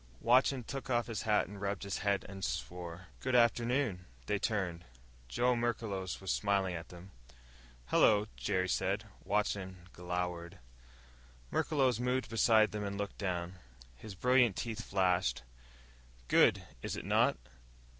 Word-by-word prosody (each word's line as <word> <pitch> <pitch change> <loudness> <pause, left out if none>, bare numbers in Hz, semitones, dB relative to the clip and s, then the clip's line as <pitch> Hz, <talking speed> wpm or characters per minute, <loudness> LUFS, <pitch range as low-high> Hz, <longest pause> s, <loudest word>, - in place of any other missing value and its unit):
Watson 130 +2 +3
took 135 +3 -6
off 120 -2 +2
his 115 -4 -4
hat 105 - +4
and 100 0 -10
rubbed 100 -1 -2
his 100 -1 -3
head 100 -2 0
and 95 0 -8
swore. 90 +1 -5
"Good 130 -1 -1
afternoon." 120 -4 +2 0.2
They 105 - 0
turned. 95 -7 -1 0.4
Joe 120 - +2
Merklos 110 -6 -2
was 95 - -3
smiling 100 -3 +1
at 85 -1 -6
them. 90 +2 -12 0.7
"Hello," 105 - +4
Jerry 95 0 0
said. 100 +4 0 0.2
Watson 100 -2 -1
just 90 - -20
glowered. 90 0 -4 0.9
Merklos 130 -6 +1
moved 125 +1 -1
beside 110 -1 +4
them 105 -1 -4
and 100 0 -4
looked 100 -1 -5
down. 90 -1 -3 0.4
His 100 - -10
brilliant 125 0 +4
teeth 115 -1 -4
flashed. 90 - +1 0.8
"Good, - - +4 0.2
is - - -3
it - - -6
not?" - - +3
100 Hz, 140 wpm, -33 LUFS, 90-115 Hz, 0.9 s, hat